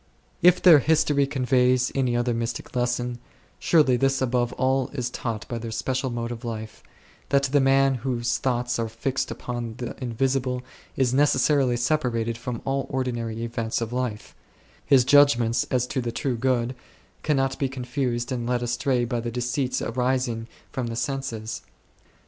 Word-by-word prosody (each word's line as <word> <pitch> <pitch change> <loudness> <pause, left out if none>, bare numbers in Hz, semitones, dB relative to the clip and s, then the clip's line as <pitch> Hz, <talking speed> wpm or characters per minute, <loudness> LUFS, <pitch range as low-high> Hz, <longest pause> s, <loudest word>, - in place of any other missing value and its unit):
If 180 +1 +5
their 170 -5 +9
history 145 -1 +2
conveys 130 -2 +2
any 130 -3 +1
other 120 0 0
mystic 115 +2 -4
lesson, 120 0 -1 0.4
surely 150 -7 +4
this 135 +1 +1
above 125 -2 0
all 130 0 +1
is 125 -3 -3
taught 115 -4 -4
by 120 - -4
their 115 0 -6
special 130 +4 -2
mode 120 0 -3
of 120 +1 -7
life, 110 -2 -6 0.5
that 140 0 +3
the 140 +1 +2
man 135 0 +4
whose 120 -2 -1
thoughts 125 -2 -1
are 115 -1 -1
fixed 130 +4 -2
upon 120 -2 -5
the 120 -3 -5
invisible 125 +1 -1 0.3
is 130 -2 +2
neces 140 -1 +3
sarily 135 -5 +2
separated 120 -4 0
from 115 0 -6
all 135 0 -1
the - - -22
ordinary 120 -3 -2
events 115 -1 -2
of 115 0 -4
life; 125 -4 -3 0.5
his 130 -3 +4
judgments 125 -5 +4
as 125 -1 +1
to 130 - -2
the 120 -1 -3
True 125 +2 -2
Good 125 0 0 0.5
cannot 135 -3 0
be 135 - 0
confused 125 -1 -3
and 120 -2 -2
led 125 -1 0
astray 120 +1 0
by 120 0 -2
the 120 +1 -3
deceits 125 +2 -1
arising 125 -2 -1 0.2
from 130 -4 -3
the 115 - -4
senses. 125 -4 -3
125 Hz, 165 wpm, -25 LUFS, 120-135 Hz, 0.5 s, their